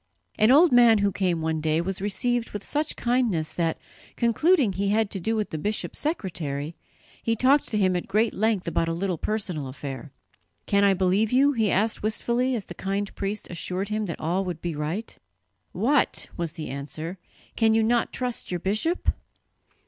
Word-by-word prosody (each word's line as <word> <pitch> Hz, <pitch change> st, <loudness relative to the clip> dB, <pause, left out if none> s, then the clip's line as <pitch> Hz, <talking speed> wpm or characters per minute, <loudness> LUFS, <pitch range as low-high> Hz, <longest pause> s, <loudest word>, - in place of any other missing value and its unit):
An 215 Hz, -, +5 dB
old 305 Hz, +6 st, +7 dB
man 240 Hz, -2 st, +7 dB
who 200 Hz, -1 st, +2 dB
came 180 Hz, -4 st, 0 dB
one 160 Hz, -1 st, -1 dB
day 155 Hz, +1 st, +1 dB
was 185 Hz, +2 st, -3 dB
received 235 Hz, +4 st, 0 dB
with 205 Hz, -1 st, -5 dB
such 300 Hz, +1 st, -2 dB
kindness 225 Hz, -11 st, 0 dB
that, 165 Hz, -1 st, 0 dB, 0.4 s
concluding 240 Hz, -, +3 dB
he 195 Hz, +2 st, -1 dB
had 215 Hz, 0 st, +1 dB
to 195 Hz, -, -4 dB
do 225 Hz, +6 st, -1 dB
with 215 Hz, -2 st, -2 dB
the 155 Hz, -, -3 dB
bishop's 210 Hz, +6 st, -2 dB
secretary, 165 Hz, -, -3 dB, 0.5 s
he 230 Hz, -, 0 dB
talked 265 Hz, +5 st, +3 dB
to 215 Hz, -, -1 dB
him 185 Hz, -3 st, +2 dB
at 175 Hz, -, -3 dB
great 215 Hz, +3 st, +1 dB
length 215 Hz, -3 st, 0 dB
about 165 Hz, 0 st, 0 dB
a 165 Hz, -, -1 dB
little 180 Hz, -2 st, -2 dB
personal 185 Hz, -10 st, -2 dB
affair. 135 Hz, +1 st, -7 dB, 0.5 s
"Can 200 Hz, 0 st, +2 dB
I 200 Hz, -1 st, +5 dB
believe 190 Hz, +4 st, +2 dB
you?" 275 Hz, +3 st, +5 dB
he 225 Hz, -6 st, +1 dB
asked 215 Hz, +4 st, +1 dB
wistfully, 240 Hz, +4 st, 0 dB
as 210 Hz, -5 st, -4 dB
the -, -, -8 dB
kind 195 Hz, +3 st, -3 dB
priest 200 Hz, +2 st, -4 dB
assured 185 Hz, +3 st, -3 dB
him 215 Hz, -1 st, -1 dB
that 170 Hz, -, -5 dB
all 175 Hz, +5 st, 0 dB
would 180 Hz, -4 st, -4 dB
be 170 Hz, -2 st, -4 dB
right. 160 Hz, +9 st, -4 dB, 0.6 s
"What!" 255 Hz, +10 st, +1 dB
was 170 Hz, -3 st, -3 dB
the 155 Hz, -5 st, -6 dB
answer, 155 Hz, +6 st, -6 dB, 0.4 s
"can 220 Hz, -1 st, +3 dB
you 225 Hz, -, +3 dB
not 235 Hz, +1 st, +1 dB
trust 250 Hz, -2 st, -3 dB
your 180 Hz, -, -2 dB
bishop?" 215 Hz, -, 0 dB
200 Hz, 185 wpm, -25 LUFS, 170-225 Hz, 0.6 s, old